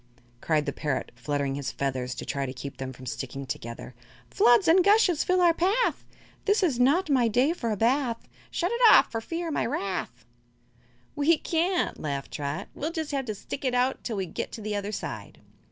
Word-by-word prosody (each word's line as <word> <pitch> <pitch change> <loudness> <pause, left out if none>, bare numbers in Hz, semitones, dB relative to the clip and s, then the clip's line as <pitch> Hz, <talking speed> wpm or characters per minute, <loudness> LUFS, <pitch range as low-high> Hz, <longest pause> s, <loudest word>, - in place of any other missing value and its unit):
Cried 155 -2 +1
the - - -2
parrot, 135 -4 -3
fluttering 140 +3 -2
his 140 -1 -3
feathers 130 -2 -3
to - - -6
try 140 -1 -2
to 130 - -5
keep 135 +1 -8
them 130 -1 -5
from 130 0 -12
sticking 135 +2 -5
together: 120 -1 -6 0.4
"Floods 240 - +5
and 350 +3 +6
gushes 400 -5 +4
fill 365 0 +2
our 345 -1 +5
path 395 +9 +1 0.4
This 410 0 +3
is 280 -9 +1
not 290 +10 +3
my 260 -5 +3
day 250 +8 +2
for 235 -9 -3
a 215 - -1
bath! 240 +1 0 0.2
Shut 350 +3 -1
it 470 +1 -2
off, - - +6
or 225 - -2
fear 335 +6 -4
my - - 0
wrath." 195 - -4 0.9
"We 305 +3 +3
can't," 350 +4 0
laughed 140 -3 -4
Trot. 145 0 -4
"We'll 310 +3 -3
jus' 320 -3 -4
have 275 -2 -1
to 215 -3 -4
stick 270 - -7
it 255 -2 0
out 250 +2 +1
till 225 -4 -3
we 190 - -1
get - - -5
to 225 - -7
the 210 0 -3
other 205 0 -3
side." - - -6
235 Hz, 200 wpm, -27 LUFS, -, 0.9 s, and